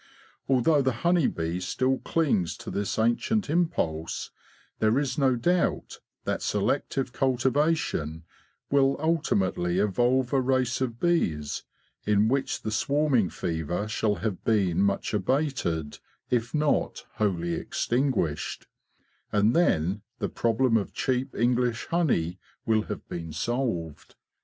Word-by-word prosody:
Although 140 +3 +4
the 130 -1 +1
honey 175 -4 +4
bee 85 +2 -2
still 130 +9 0
clings 120 - 0
to - - -7
this 100 0 -2
ancient 120 - +1
impulse, 85 - -1 0.5
there 110 +3 +3
is 140 -3 0
no 135 -2 +3
doubt 175 +10 0 0.2
that - - -2
selective 135 -2 -1
cultivation 130 - 0 0.5
will 135 -1 +4
ultimately 100 - 0
evolve 120 +6 +2
a 135 - +4
race 130 -1 +1
of 120 -3 -2
bees 80 - 0 0.4
in 105 +1 +3
which 135 +1 -1
the 110 - -2
swarming 140 - +2
fever 85 +6 -3
shall 110 -1 0
have 105 -5 -3
been 95 -5 +2
much 100 +1 0
abated, 105 - -1 0.3
if 120 -1 +1
not 150 -1 0
wholly 85 -5 0
extinguished; 120 - -1 0.7
and 105 +2 +3
then 100 - +2 0.2
the - - -2
problem 115 +1 +2
of 100 - -3
cheap 130 0 -1
English 120 -1 +1
honey 95 - +1 0.3
will 110 -1 +3
have - - -6
been 80 -2 -6
solved. 85 - -3
120 Hz, 125 wpm, -27 LUFS, 95-135 Hz, 0.7 s, Although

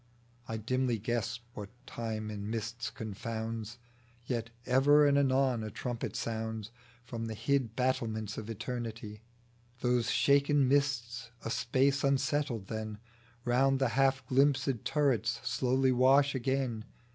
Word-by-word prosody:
I 110 - -3
dimly 125 +2 0
guess 120 +2 -2
what 105 -1 -7 0.2
Time 110 -2 -4
in 105 0 -5
mists 115 +1 -3
confounds; 110 +1 -5 0.5
Yet 115 -3 -2 0.2
ever 145 +4 +5
and 140 -1 +4
anon 130 -4 +2
a 110 - -4
trumpet 120 +3 -4
sounds 110 -1 -3 0.3
From 115 -1 -5
the 110 - -4
hid 120 0 0
battlements 110 -4 -1
of 110 0 -6
Eternity; 115 -2 -5 0.6
Those 125 -1 +2
shaken 140 0 +4
mists 130 -4 0 0.2
a 115 - -2
space 135 +2 +1
unsettle, 140 -2 +1
then 110 +1 -5 0.5
Round 135 +2 +3
the 135 -2 +1
half 135 +1 +2
glimpsed 135 -2 +2
turrets 135 -7 +1
slowly 130 +2 +2
wash 135 +3 +4
again. 130 -4 -1
120 Hz, 125 wpm, -31 LUFS, 110-135 Hz, 0.6 s, ever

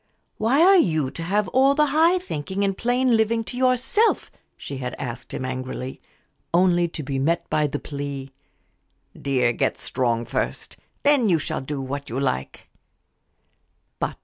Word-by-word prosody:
"Why 255 +9 +3
are 385 +2 +7
you 155 - +1
to - - -8
have 200 +4 0
all 270 +4 +4
the 300 0 +4
high 330 +4 +5
thinking 190 - -3
and 195 -1 +1
plain 245 +2 +2
living 225 +1 +2
to 245 - -7
yourself?" 255 - +2 0.3
she 140 - -7
had 125 -1 -4
asked 125 -2 -6
him, 130 - -4
angrily, 130 0 -5 0.5
only 175 -1 +4
to 165 -2 -6
be 135 -1 -2
met 165 +5 0
by 150 -1 +2
the 145 - -3
plea, 140 -2 -6 0.8
"Dear, 125 -4 +1
get - - 0
strong 120 -2 -1
first 120 - -3 0.3
then 280 -6 +4
you 170 - +4
shall 150 - -3
do 140 +1 -4
what 140 +1 -5
you 120 +4 -3
like." 65 - -3
165 Hz, 155 wpm, -23 LUFS, -, 0.8 s, are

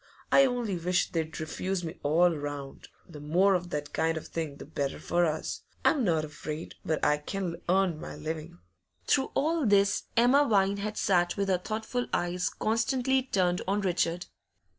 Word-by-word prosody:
I 275 - +7
only 240 -7 -2
wish 175 +1 0
they'd 160 -3 -3
refuse 180 +4 -3
me 165 +2 -6
all 165 +4 +3
round; 145 -2 -6 0.2
the 155 -4 -10
more 175 +7 +3
of 180 -1 -1
that 150 -2 -4
kind 160 0 +1
of 160 - -6
thing 160 -4 -4
the - - -10
better 140 -2 -3
for 175 0 +1
us. 155 0 -3 0.2
I'm 285 -5 +4
not 160 -6 +1
afraid 150 +1 -6
but 155 -1 0
I 150 0 +3
can 175 +2 -4
earn 185 -3 +2
my - - -7
living.' 155 - -6 0.5
Through 270 -1 +2
all 320 +2 +1
this 200 -1 +3
Emma 265 +5 +5
Vine 200 -1 +3
had 210 +1 -4
sat 175 -2 +2
with 200 -1 0
her 185 -2 +2
thoughtful 220 +5 -3
eyes 175 +1 0
constantly 255 +4 +1
turned 185 -8 0
on 200 +2 +1
Richard. 175 -2 0
180 Hz, 175 wpm, -29 LUFS, 160-205 Hz, 0.5 s, I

